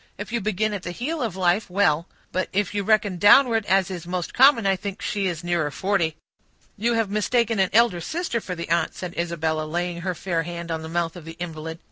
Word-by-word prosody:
If - - -7
you 235 - 0
begin 215 +1 0
at 200 - -4
the 180 - -6
heel 270 - -3
of 225 -7 -2
life, 185 +2 +1
well; 180 -3 +2 0.2
but 185 - -1
if 205 +1 0
you 205 - 0
reckon 205 -2 +2
downward, 225 +2 +6
as 190 0 +2
is 175 -2 -6
most 180 -1 -3
common, 260 -4 +6
I 195 0 +3
think 195 +1 -6
she 200 -2 -1
is 175 -2 -4
nearer 170 -3 0
forty." 170 -1 0 0.6
"You 230 +3 0
have 225 -3 0
mistaken 225 +1 +1
an 190 -1 +3
elder 220 -6 +3
sister 315 - -2
for 180 - -5
the 170 -1 -6
aunt," 170 - +1
said 180 -2 -6
Isabella, 160 -2 -1
laying 175 +1 -3
her 180 0 -2
fair 170 0 -1
hand 170 0 -6
on 160 -1 -2
the 160 - -7
mouth 170 0 -1
of 175 - -9
the 165 +1 -8
invalid. 160 -1 -6
185 Hz, 225 wpm, -24 LUFS, 170-210 Hz, 0.6 s, downward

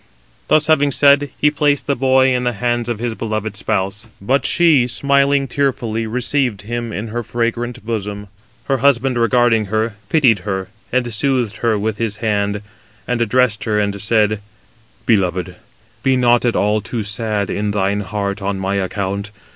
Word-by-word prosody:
Thus 155 -1 +3
having 150 -2 +3
said, 140 +1 +4
he 150 - +3
placed 145 -1 +1
the 140 - 0
boy 130 0 +3
in 125 0 0
the 120 -1 0
hands 120 +1 -1
of 120 - -2
his 120 +1 -3
beloved 110 -2 -3
spouse; 100 +1 -2
but 130 +8 +1
she 155 -8 +4
smiling 140 +2 +2
tearfully 120 -4 -1
received 125 -2 -1
him 120 +1 -4
in 110 +2 -5
her 120 +2 -3
fragrant 120 +1 -3
bosom. 105 -2 -4 0.4
Her 135 - +1
husband 130 -2 +2
regarding 115 -2 +3
her, 110 +2 -1 0.2
pitied 130 -10 +4
her, 95 0 -4 0.2
and 120 -2 0
soothed 125 -2 0
her 115 -2 +1
with 105 +1 -2
his 115 -3 -2
hand, 105 -2 -1 0.4
and 125 -1 -1
addressed 115 -2 +1
her, 105 -2 +1
and 100 -1 -1
said: 110 -1 +2 0.7
"Beloved, 95 -5 +1 0.5
be 130 -1 +2
not 120 -1 +3
at 120 - +1
all 105 +1 +1
too 115 0 -4
sad 105 0 -2
in 105 0 -1
thine 100 0 0
heart 100 0 -3
on 100 0 -2
my 95 +1 -1
account. 100 +1 -3
115 Hz, 165 wpm, -18 LUFS, 105-125 Hz, 0.7 s, said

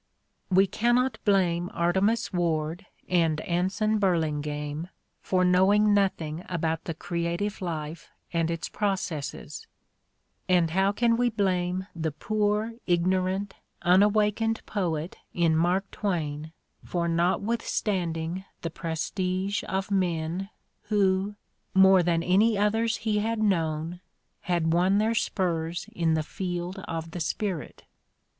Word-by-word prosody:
We 190 +1 +5
cannot 240 +4 +1
blame 180 -4 +2
Artemus 190 +7 +1
Ward 170 +1 -1 0.2
and 165 -4 +2
Anson 190 +6 0
Burlingame 150 -4 -1 0.3
for 185 -1 +1
knowing 200 +4 +4
nothing 175 -5 0
about 165 -2 -1
the 165 - -4
creative 170 +6 -2
life 160 -2 -5 0.2
and 165 -1 +1
its 165 0 -3
processes; 185 -8 -3 0.8
and 175 -3 +3
how 190 +3 +3
can 230 +2 +2
we 245 0 +3
blame 185 -3 0
the 160 -2 -2
poor, 210 +6 0
ignorant, 185 +3 +1 0.3
unawakened 210 +4 +3
poet 170 -5 -2 0.2
in 165 -2 +3
Mark 180 +4 +1
Twain 160 -6 -2 0.3
for 170 -1 -1
not 170 +4 +1
withstanding 185 -6 -1 0.2
the 165 - -3
prestige 185 +4 -2
of 195 0 -2
men 180 0 -1 0.4
who, 200 -1 +1 0.4
more 190 -1 +7
than 170 -1 +1
any 205 +5 +3
others 225 +2 +1
he 215 -1 0
had 225 +2 -1
known, 170 -4 0 0.4
had 170 -2 0
won 185 +3 +3
their 220 +2 +2
spurs 170 -6 -1
in 165 -2 +1
the 155 - 0
field 180 +2 -4
of 165 0 -4
the 175 - -5
spirit 180 0 -3
180 Hz, 120 wpm, -27 LUFS, 165-205 Hz, 0.8 s, more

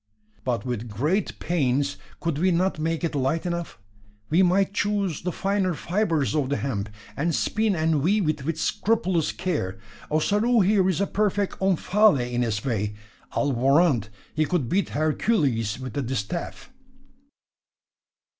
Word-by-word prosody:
"But, 125 -1 -1
with 120 -2 -3
great 150 - -1
pains, 140 - 0 0.2
could 165 -3 -2
we 185 +3 +3
not 180 -1 +1
make 165 +2 -1
it 165 - -1
light 145 +5 0
enough? 170 -1 -3 0.5
We 170 +4 +5
might 190 +2 +3
choose 200 -5 0
the 180 - -2
finer 195 -1 0
fibres 170 -6 0
of 145 -4 0
the 140 - 0
hemp; 110 -6 -3 0.3
and 165 +3 0
spin 215 -2 +1
and 160 -2 +1
weave 195 +3 +2
it 150 -2 -1
with 160 +2 -2
scrupulous 190 -7 +1
care. 150 - -2 0.3
Ossaroo 210 +9 +2
here 190 -1 +3
is 185 +1 0
a - - +3
perfect 205 -1 -1
Omphale 190 - +3
in 120 - +1
his 110 -3 -1
way. 105 -4 -1 0.4
I'll 145 - +1
warrant 135 - +3 0.2
he 155 0 +1
could 160 -10 0
beat 195 +6 +1
Hercules 145 - 0
with 130 -3 -6
the 140 - -1
distaff." 130 - -4
160 Hz, 150 wpm, -25 LUFS, 130-190 Hz, 0.5 s, We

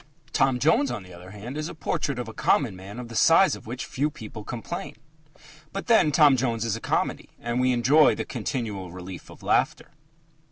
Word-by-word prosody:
Tom 135 -2 +3
Jones, 145 +1 +3
on 120 -5 -4
the 90 -1 -13
other 90 +1 -12
hand, 105 +6 -8
is 155 +2 -3
a - - -8
portrait 140 -3 -2
of 120 -2 -4
a 110 - -8
common 115 -5 +1
man 95 +4 -10
of 125 -1 -6
the 115 - -10
size 165 +9 +5
of - - -13
which 125 +2 -5
few 145 +4 -1
people 110 -6 -9
complain. 170 - -6 0.8
But 195 - -5
then 220 -10 +4
Tom 145 -2 +6
Jones 115 -3 -1
is 115 - 0
a - - -7
comedy, - - -1
and 120 +1 -2
we 130 0 +3
enjoy 135 +6 +5
the - - -4
continual 105 - -4
relief 90 0 -9
of - - -14
laughter. - - +1
120 Hz, 205 wpm, -26 LUFS, 105-145 Hz, 0.8 s, Tom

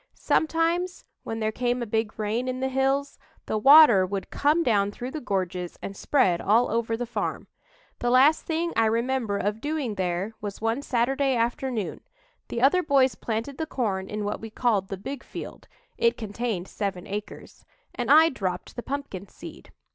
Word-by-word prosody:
Sometimes, 335 +3 0 0.2
when 225 - -5
there 215 0 0
came 245 +1 -1
a - - -3
big 220 0 -2
rain 220 +4 -1
in 255 0 -2
the 265 0 -1
hills, 270 +2 0 0.3
the 215 - -1
water 270 -5 +8
would 195 +1 -4
come 305 +4 +2
down 205 -6 +2
through 245 +5 -6
the 310 - -5
gorges 185 -5 -3
and 195 - -7
spread 190 -8 +2
all 230 +4 +3
over 230 0 0
the 245 - -3
farm. 240 - -3 0.5
The 240 - 0
last 265 +5 +5
thing 335 +1 -2
I 225 -1 +3
remember 230 -2 0
of 210 +3 -2
doing 295 -6 -2
there 185 +2 -2
was 205 -1 -5
one 225 +4 -1
Saturday 270 +1 +1
afternoon; 235 -2 -2 0.5
the 235 - -3
other 325 +7 +5
boys 275 -5 +3
planted 230 +5 -4
the 320 - -2
corn 195 -9 -2
in 210 0 -3
what 205 - -3
we 225 - -7
called 215 -4 0
the 195 - -5
big 260 +7 -7
field - - -9 0.3
it 465 0 +3
contained 215 -3 -3
seven 195 -3 -4
acres 205 +1 -7 0.3
and 245 -1 -3
I 315 +3 +7
dropped 185 - -4
the 240 - -4
pumpkin 260 -9 -5
seed. - - -12
235 Hz, 175 wpm, -26 LUFS, 205-270 Hz, 0.5 s, water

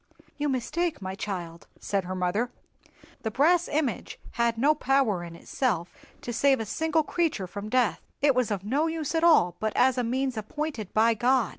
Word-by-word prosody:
"You 295 0 -1
mistake, 310 +6 -1
my 190 -1 -5
child," 180 -4 -6
said 195 -2 -1
her 185 +1 -4
mother. 185 +7 0 0.7
"The 220 - -2
brass 330 +9 +3
image 290 -5 -2
had 235 -1 0
no 285 +6 +4
power 270 - +1
in 170 -1 -8
itself 180 -4 -2 0.3
to 240 - -5
save 275 +2 +3
a 225 - -2
single 320 +8 0
creature 310 - -1
from 200 +3 -7
death; 250 -1 +1 0.2
it 285 -1 +4
was 250 -3 +1
of 200 -3 -2
no 280 +10 +1
use 320 -2 -3
at 325 0 +1
all 180 - +5
but 220 0 -1
as 255 0 +3
a - - +1
means 255 +1 -1
appointed 220 -1 -4
by 225 +2 +5
God. 240 0 +2
245 Hz, 185 wpm, -27 LUFS, 205-290 Hz, 0.7 s, all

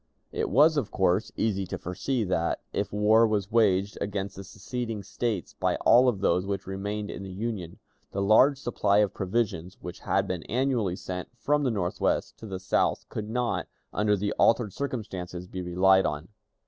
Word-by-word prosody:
It - - -2
was, 150 +7 +5
of 145 - 0
course, 95 +2 +1
easy 100 -4 0
to - - -4
foresee 110 +8 -2
that, 85 -4 0
if 100 0 -2
war 110 +2 +4
was 105 -1 -1
waged 100 -3 +2
against 100 -1 -3
the 95 - -8
seceding 110 +2 -5
States 105 -1 -3
by - - 0
all 125 +2 +5
of 100 -6 -3
those 90 -2 +2
which 100 0 -3
remained 100 +2 -4
in - - -7
the 95 - -7
Union, 95 -3 -4 0.3
the 100 - -4
large 110 +8 +5
supply 105 -6 +1
of 105 -2 +3
provisions 95 -3 -2
which 90 0 -8
had 95 0 0
been 90 -3 -3
annually 120 -7 +1
sent 90 -1 -6
from 150 +3 +1
the 135 - +1
Northwest 95 -6 -1
to 110 - -8
the 95 -2 -5
South 95 0 0
could 105 -1 -5
not, 120 +1 -1 0.3
under 105 0 +2
the 100 +2 -1
altered 115 -4 +3
circumstances, 95 -10 -5
be 90 0 -5
relied 95 +2 +4
on. 75 +4 -4
100 Hz, 180 wpm, -27 LUFS, 95-115 Hz, 0.3 s, was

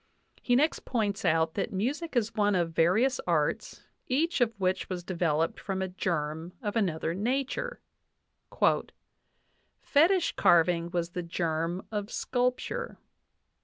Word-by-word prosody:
He 245 - +2
next 300 +5 +2
points 210 -5 -1
out 160 0 +2
that 200 - -2
music 275 - -2
is 230 -2 +1
one 205 -1 +2
of 170 -2 +1
various 215 +11 +3
arts, 155 -4 0 0.2
each 305 +3 +1
of 235 -2 +3
which 185 0 0
was 180 -2 -4
developed 165 -3 0
from 195 -1 -3
a 190 - -1
germ 165 -2 -3
of 210 -4 -4
another 170 -6 0
nature: 250 +8 -2 2.0
"Fetich 340 +5 +3
carving 170 0 +4
was 175 -1 -2
the 180 - -3
germ 170 +1 -2
of 205 -1 -3
sculpture. 250 - -2
190 Hz, 130 wpm, -29 LUFS, 170-245 Hz, 2.0 s, carving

